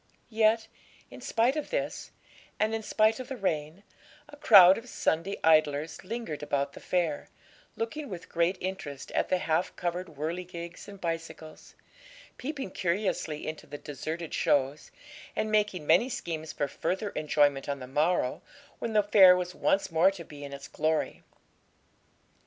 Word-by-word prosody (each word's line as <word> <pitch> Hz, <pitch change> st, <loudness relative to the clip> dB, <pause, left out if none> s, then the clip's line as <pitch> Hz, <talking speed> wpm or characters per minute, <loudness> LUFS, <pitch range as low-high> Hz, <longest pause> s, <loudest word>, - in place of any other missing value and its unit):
Yet, 225 Hz, 0 st, +3 dB, 0.4 s
in -, -, -11 dB
spite 235 Hz, +5 st, +1 dB
of 305 Hz, -, -3 dB
this, -, -, -3 dB, 0.5 s
and 215 Hz, +1 st, +1 dB
in 225 Hz, -, -1 dB
spite 220 Hz, +1 st, +2 dB
of 255 Hz, -, -6 dB
the 265 Hz, -, -5 dB
rain, 160 Hz, -2 st, -2 dB, 0.4 s
a 295 Hz, -, -12 dB
crowd 200 Hz, -10 st, +8 dB
of 240 Hz, +2 st, -13 dB
Sunday 165 Hz, +5 st, -1 dB
idlers 155 Hz, -1 st, +2 dB
lingered 215 Hz, -7 st, -5 dB
about 140 Hz, -1 st, -1 dB
the -, -, -10 dB
fair, 170 Hz, -5 st, -1 dB, 0.5 s
looking 260 Hz, +6 st, -4 dB
with 180 Hz, -4 st, -7 dB
great 170 Hz, +2 st, +1 dB
interest 180 Hz, -7 st, -5 dB
at -, -, 0 dB
the 185 Hz, -, +3 dB
half 165 Hz, 0 st, -1 dB
covered 175 Hz, +1 st, -3 dB
whirligigs 170 Hz, +3 st, -6 dB
and 200 Hz, -1 st, -11 dB
bicycles, 165 Hz, -2 st, -6 dB, 0.6 s
peeping 270 Hz, -6 st, -5 dB
curiously 175 Hz, -5 st, -2 dB
into 155 Hz, 0 st, -6 dB
the 145 Hz, -, -7 dB
deserted 155 Hz, +3 st, -6 dB
shows, 140 Hz, +1 st, +1 dB, 0.5 s
and 215 Hz, -, -1 dB
making 210 Hz, -6 st, +1 dB
many 240 Hz, -, +4 dB
schemes 160 Hz, -9 st, -4 dB
for 145 Hz, -, -2 dB
further 200 Hz, +7 st, -2 dB
enjoyment 145 Hz, -2 st, +1 dB
on 140 Hz, -, -1 dB
the 130 Hz, -, -8 dB
morrow, 150 Hz, +1 st, 0 dB, 0.4 s
when 230 Hz, -, -3 dB
the 210 Hz, -1 st, +4 dB
fair 190 Hz, -3 st, +7 dB
was 180 Hz, 0 st, -3 dB
once 195 Hz, -, +1 dB
more 165 Hz, +4 st, +5 dB
to 195 Hz, -3 st, -7 dB
be 145 Hz, -1 st, -11 dB
in 140 Hz, -, -7 dB
its 140 Hz, 0 st, -8 dB
glory. 155 Hz, 0 st, -1 dB
175 Hz, 155 wpm, -29 LUFS, 155-210 Hz, 0.6 s, crowd